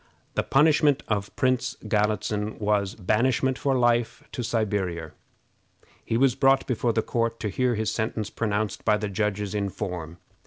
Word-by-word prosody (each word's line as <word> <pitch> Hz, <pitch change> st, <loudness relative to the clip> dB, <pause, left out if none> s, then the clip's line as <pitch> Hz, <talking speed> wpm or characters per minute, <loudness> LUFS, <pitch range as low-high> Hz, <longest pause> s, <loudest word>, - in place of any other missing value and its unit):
The -, -, +1 dB
punishment 150 Hz, 0 st, +3 dB
of 100 Hz, -2 st, -2 dB
Prince 125 Hz, -1 st, 0 dB
Galitzin 105 Hz, 0 st, 0 dB
was 105 Hz, -1 st, 0 dB
banishment 125 Hz, +6 st, +1 dB
for 135 Hz, -2 st, +1 dB
life 120 Hz, -1 st, +1 dB
to 125 Hz, -, -4 dB
Siberia. 95 Hz, -8 st, -1 dB, 0.9 s
He 115 Hz, -, -1 dB
was 130 Hz, 0 st, +4 dB
brought 135 Hz, 0 st, +3 dB
before 120 Hz, -1 st, 0 dB
the 110 Hz, -1 st, 0 dB
court 115 Hz, -1 st, -1 dB
to 105 Hz, -, -1 dB
hear 125 Hz, +4 st, +1 dB
his 110 Hz, 0 st, -1 dB
sentence 110 Hz, -1 st, -2 dB
pronounced 105 Hz, -2 st, -2 dB
by 105 Hz, -, +3 dB
the 105 Hz, -1 st, -3 dB
judges 105 Hz, 0 st, -1 dB
in 100 Hz, -1 st, -1 dB
form. 90 Hz, -5 st, -5 dB
110 Hz, 155 wpm, -26 LUFS, 105-125 Hz, 0.9 s, was